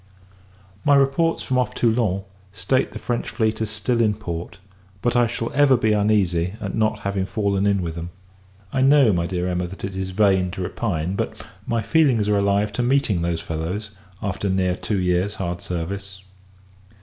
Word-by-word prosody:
My 145 -1 +5
reports 140 +4 +2
from 130 -1 0
off 125 - -1
Toulon, 110 -5 +1 0.3
state 100 +7 0
the - - -7
French 120 -1 -2
fleet 110 -2 -1
as 110 - -1
still 110 +3 0
in 105 -2 +2
port; 90 -3 -6 0.4
but, 120 +4 0
I 120 -1 +4
shall 115 0 -3
ever 140 -2 +5
be 110 -2 +2
uneasy 100 -4 +1
at 100 -2 -4
not 110 -1 0
having 100 -1 -1
fallen 100 0 0
in 100 -2 +2
with 85 -1 -3
them. 85 +1 -6 0.6
I 130 - +1
know, 135 -4 +5
my 85 -1 0
dear 90 -1 -2
Emma, 90 0 -1
that 95 +3 -11
it 95 0 -4
is 95 0 -3
in 95 - -9
vain 95 -3 +3
to 100 - -5
repine; 90 -3 -2
but - - -4 0.2
my 115 -2 0
feelings 125 -5 +3
are 105 -1 +3
alive 100 +1 +1
to 125 - -2
meeting 120 -7 +2
those 85 -1 -1
fellows, 90 +6 -4 0.3
after 100 0 -2
near 95 -1 +1
two 100 +1 -2
years 90 +3 0
hard 90 -4 -4
service. 95 +2 -5
100 Hz, 185 wpm, -22 LUFS, 90-115 Hz, 0.6 s, My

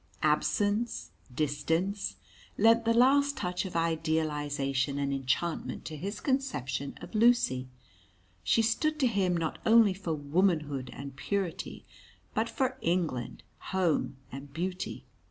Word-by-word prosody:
Absence, 205 - +1 0.2
distance, 165 +8 -1 0.4
lent 230 +2 +5
the 230 - +4
last 280 +4 +4
touch 180 0 -2
of 185 - -7
idealisation 150 -4 0
and 140 -1 0
enchantment 135 +5 -2
to 155 - -5
his 200 +7 -5
conception 140 - -2
of - - -10
Lucy. 215 - +3 0.8
She 225 - +3
stood 305 +8 +1
to 270 - +3
him 195 -7 +2
not 160 -2 -2
only 225 -3 +6
for 180 -4 -3
Womanhood 150 -3 0
and 140 -1 -8
Purity, 195 +3 -3 0.5
but 225 +1 0
for 260 0 -1
England, 165 -8 -1 0.3
Home, 170 -7 +1 0.2
and 135 +2 -8
Beauty. 180 +4 -4
170 Hz, 120 wpm, -30 LUFS, 145-220 Hz, 0.8 s, only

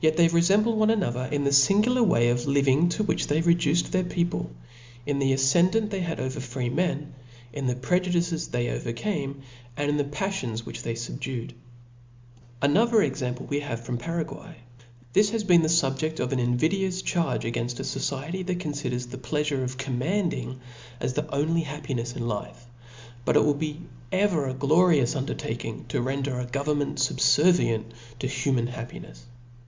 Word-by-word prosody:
they 170 0 +6
refemble 195 +7 +3
one 215 0 +3
another 130 - 0
in 145 -1 0
the 140 -1 +5
Angular 230 +6 +3
way 120 - +4
of 120 +1 0
living 140 +3 +3
to 215 +5 -1
which 210 - 0
they 150 +2 +2
reduced 170 -1 +2
their 185 -1 +2
people, 175 - -1 0.6
in 145 -1 -1
the 135 -1 +2
afcendant 175 +11 +3
they 195 - -2
had 170 -2 -3
over 130 +2 -3
free 125 -1 -3
men, 150 0 -1 0.4
in 140 -3 -3
the 125 - +1
prejudices 175 +3 0
they 120 -1 -1
overcame, 140 - -3 0.3
and 145 0 0
in 145 - +1
the 145 - +2
paflions 140 - -3
which 115 +1 -7
ihey 115 - -3
fubducd> 120 +1 -5 1.1
Another 220 +9 +4
example 125 0 -3
we 145 - -1
have 130 -6 -4
from 120 0 -3
Paraguay* 165 +3 -5 0.6
This 205 0 +5
has 225 0 -1
been 175 -4 +6
the 160 - +1
fubjeft 155 -1 +1
of 125 - -1
an 130 - 0
invidious 180 +10 0
charge 170 -3 0
ag^inft 120 +1 -3
a - - -3
Society 145 +7 -3
that 185 -1 -2
confiders 140 -7 -3
the 130 - -7
pleafure 140 +2 -1
of 130 0 -4
command 145 +9 -1
ing 130 +1 -5 0.4
as 125 +1 -2
the 150 +3 -2
only 160 +4 +1
happinefs 135 -5 -4
in 120 - -3
life: 105 +2 -5 0.6
but - - +1
it - - +5
will 150 - +4
be 150 +1 -4 0.3
ever 185 -7 +2
a 130 - -2
glorious 150 -1 +3
undertaking 115 -4 -4
to - - 0
render 130 0 -2
government 145 +1 -1
fub 135 0 +1
fervient 150 -9 +4 0.3
to 130 - -4
human 130 -2 0
happinefs 120 -1 -7
"f*. - - -17
145 Hz, 170 wpm, -26 LUFS, 125-175 Hz, 1.1 s, they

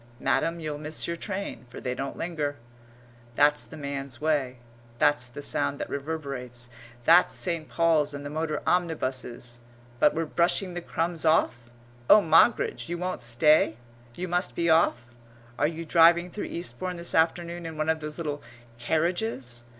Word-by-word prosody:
"Madam, 165 +7 0
you'll 150 -2 -4
miss 155 +1 -4
your 170 - -2
train," 195 - -5
for - - -9
they 125 - -3
don't 135 +2 -5
linger. 155 -4 -3 0.8
That's 145 +1 +4
the 160 - -12
man's 140 -3 -5
way; 145 -4 0 0.4
that's 145 -2 +2
the 135 +4 -9
sound 140 0 -1
that - - -5
reverberates; 135 -5 -5 0.3
that's 170 +2 +6
St. 165 -5 -2
Paul's 155 0 +2
and 145 0 -7
the - - -4
motor 155 -1 -2
omnibuses. 130 -8 -2 0.4
But - - +4
we're 165 +1 0
brushing 175 +3 +1
the 175 - -4
crumbs 165 0 -2
off. 120 -7 +2 0.4
Oh, 215 - +9
Moggridge, 165 +2 +3
you 175 - -2
won't 180 +1 -3
stay? 120 0 +3 0.4
You 185 - -4
must 180 +1 -1
be 170 -1 +2
off? 160 -7 +3 0.5
Are 145 - +3
you 165 +1 -5
driving 170 +2 +5
through 210 - -5
Eastbourne 180 +1 -4
this 170 0 -2
afternoon 170 +1 0
in 160 -1 -8
one 155 0 -1
of 160 0 +1
those 150 -1 -5
little 150 -4 -4 0.4
carriages? 155 - -2
155 Hz, 160 wpm, -27 LUFS, 140-170 Hz, 0.8 s, Oh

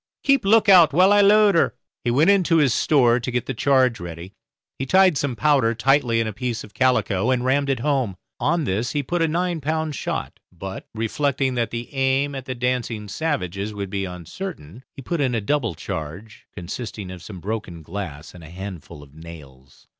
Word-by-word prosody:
Keep 275 -6 +3
a - - -1
look 220 +1 +5
out 180 -7 +7
while 185 +5 +5
I 205 - +5
load 205 0 +5
her." 165 - +2 0.3
He - - 0
went 150 +10 +4
into 180 -4 +3
his 140 -6 +3
store 125 -5 +3
to 125 - -4
get 125 -2 -2
the - - -3
charge 130 -1 +2
ready. 85 +2 -8 0.5
He 135 - -3
tied 190 +1 +5
some 140 -3 -1
powder 135 -5 +2
tightly 120 -1 +2
in 115 - +1
a 110 - -4
piece 120 +1 -3
of 105 - -14
calico 125 -5 +1
and 125 -1 +1
rammed 140 +2 +1
it 130 -4 0
home. 130 -8 0 0.2
On 165 +2 +1
this 110 0 -2
he 145 -1 -1
put 175 +6 -2
a 165 - +3
nine 170 0 -1
pound 155 +1 -2
shot; - - -4
but, 95 +2 -8
reflecting 130 +4 -1
that 120 -3 -1
the 115 +4 -6
aim 135 +1 +1
at 135 -2 -6
the 130 - -4
dancing 120 -3 -2
savages 105 - -3
would 100 -2 -5
be 100 -1 -2
uncertain, 90 - -8
he 135 - -11
put 170 +3 -2
in 130 -3 +1
a - - +1
double 115 - -1
charge, 90 +5 -7
consisting 100 +1 -7
of 90 -2 -9
some 95 0 -9
broken 95 -4 -5
glass 80 -4 -7
and 90 -2 -13
a 80 - -11
handful 90 -5 -9
of 70 -1 -18
nails. 70 -5 -14
125 Hz, 205 wpm, -22 LUFS, 95-145 Hz, 0.5 s, out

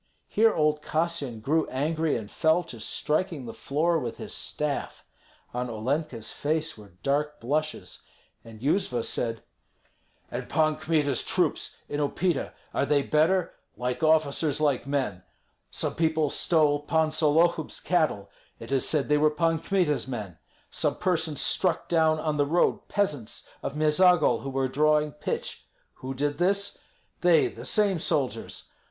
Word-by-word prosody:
Here 225 +1 +4
old 150 -4 +1
Kassyan 155 -8 -2
grew 155 +7 +1
angry, 155 +3 0
and 110 -2 -8
fell 160 +2 +2
to 125 -8 -10
striking 155 - -1
the 115 - -7
floor 165 +4 0
with 120 -5 -5
his - - -6
staff. 150 -2 -3 0.5
On 125 0 -2
Olenka's 120 +1 -2
face 155 +2 -1
were 105 -4 -15
dark 150 +2 0
blushes, 155 +6 -3 0.4
and 110 -1 -13
Yuzva 140 - 0
said, 115 -2 -2 0.9
"And - - -5
Pan 155 -1 +2
Kmita's 150 -5 +1
troops - - 0
in 145 - -3
Upita, 150 +2 0 0.2
are 140 - 0
they 145 -1 +3
better? 165 +5 +2 0.2
Like 125 +3 -2
officers, 155 -2 +2
like 140 -4 +1
men. 130 -10 -1 0.5
Some - - -2
people 160 -2 +1
stole 150 -3 +3
Pan 160 +1 +1
Sollohub's 160 +1 +2
cattle; 150 - 0 0.3
it 115 - -9
is 135 -2 +2
said 150 -3 +1
they 150 0 +3
were 155 +1 +5
Pan 165 +1 +1
Kmita's 170 -7 0
men. 105 -10 -6 0.3
Some - - 0
persons 165 -5 0
struck 185 -3 +2
down 160 -2 +3
on 155 -1 -1
the 145 -1 +2
road 170 +4 +1
peasants 150 - -2
of 140 - -4
Meizagol 155 +2 +4
who 135 - -5
were 135 0 0
drawing 150 +2 +2
pitch. 150 - -5 0.3
Who 130 +1 -5
did 145 +3 -1
this? 200 +3 +1 0.4
They, 175 -4 +4
the - - -10
same 200 -5 +2
soldiers. 140 -4 -2
150 Hz, 145 wpm, -27 LUFS, 135-160 Hz, 0.9 s, were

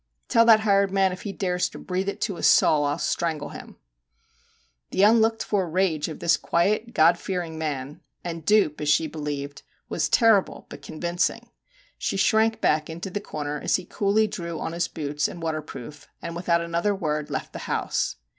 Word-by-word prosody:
Tell 230 0 +5
that 220 -2 +7
hired 200 -2 +3
man 190 -1 +2
if 180 - -7
he 205 - -5
dares 180 -2 -1
to - - -11
breathe 190 +2 -2
it - - -6
to 195 -6 -2
a - - -7
soul 150 -2 +4
I 145 - +1
'11 155 - -6
strangle 160 -4 -1
him/ - - -10 1.1
The 190 - +1
unlooked 225 +1 +4
for 190 -4 -1
rage 170 -3 0
of 160 - -6
this 170 - +2
quiet 215 +7 0
God 160 +2 +5
fearing 175 -4 -4
man 145 -2 -4 0.2
and 165 -2 -5
dupe 195 -6 +2
as 150 - -1
she 160 +2 +3
believed 145 -2 -5 0.3
was - - -1
terrible 225 -6 +3
but 145 - -10
convincing. 170 +5 -2 0.5
She - - -2
shrank 220 +3 +3
back 155 -5 +1
into 170 +4 -6
the 205 - -3
corner 150 -4 -4
as - - +1
he 185 - -3
coolly 205 +3 +1
drew 170 -5 -5
on - - -3
his 170 0 -1
boots 150 -1 -2
and 175 - -9
waterproof, 155 -3 -6
and 170 0 -6
without 170 -1 +1
another 170 +4 0
word 150 -5 -2
left - - -4
the - - -6
house. - - -1
170 Hz, 190 wpm, -25 LUFS, 155-200 Hz, 1.1 s, that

